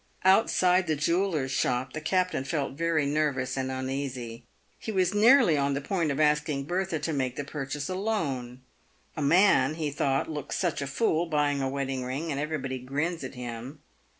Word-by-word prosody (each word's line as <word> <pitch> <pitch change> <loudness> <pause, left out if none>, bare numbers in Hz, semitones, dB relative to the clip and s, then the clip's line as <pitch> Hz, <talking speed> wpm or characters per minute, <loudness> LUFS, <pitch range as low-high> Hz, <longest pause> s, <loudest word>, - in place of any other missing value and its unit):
Outside 185 -2 +4
the 155 - +1
jeweller's 160 -2 0
shop, 130 -1 0
the 155 - -5
captain 185 -2 0
felt 140 -1 -2
very 165 0 0
nervous 140 -3 0
and 130 -1 -2
un 130 0 -3
easy. 125 -4 -5 0.3
He 220 - -5
was 185 -2 +1
nearly 215 - +5
on 140 0 +1
the - - -1
point 165 +2 -1
of 140 +1 -2
asking 150 -2 +2
Bertha 175 +2 -1
to 155 +2 -3
make 130 -3 -1
the 145 - -3
pur 140 -1 -5
chase 140 +1 -4
alone. 155 - -2 0.5
A 155 - -4
man, 155 -2 +4
he 155 -3 -2
thought, 135 -1 0
looks 150 -2 -4
such 175 -6 -1
a 140 - -3
fool 165 +3 +1
buying 145 -3 +1
a 135 - 0
wedding 135 -1 -2
ring, 140 +6 -3
and 140 - -2
everybody 140 -4 -3
grins 145 +6 -2
at 130 +1 -7
him. 125 +3 -7
145 Hz, 185 wpm, -28 LUFS, 135-170 Hz, 0.5 s, nearly